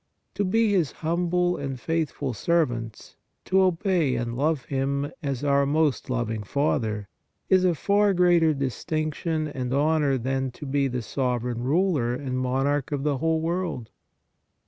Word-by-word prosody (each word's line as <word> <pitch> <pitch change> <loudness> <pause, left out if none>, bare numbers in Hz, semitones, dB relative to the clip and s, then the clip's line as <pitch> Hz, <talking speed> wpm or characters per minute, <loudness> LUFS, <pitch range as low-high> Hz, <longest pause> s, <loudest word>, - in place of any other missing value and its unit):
To 205 - -1
be 220 +3 +2
His 175 -8 +2
humble 175 +2 0
and 135 -2 -4
faithful 160 -4 -2
servants, 120 - -1 0.3
to 190 +1 +3
obey 180 -6 +2
and 120 0 -3
love 145 +1 0
Him 140 +1 -1
as 140 -3 -3
our 140 -1 +3
most 150 -2 +1
loving 115 -3 -1
Father 110 -3 -1 0.4
is 185 -1 +5
a 180 -2 +3
far 200 +3 +2
greater 175 -2 +4
distinction 155 +4 -2
and 130 -4 -4
honor 145 0 +2
than 130 +2 -1
to 150 - -9
be 140 0 +1
the 125 -2 -3
sovereign 125 -1 -2
ruler 140 -3 +1
and 130 -1 -3
monarch 135 +3 0
of 140 -2 -2
the 145 -3 0
whole 160 +1 +1
world. 165 -8 -3
145 Hz, 145 wpm, -25 LUFS, 130-165 Hz, 0.4 s, is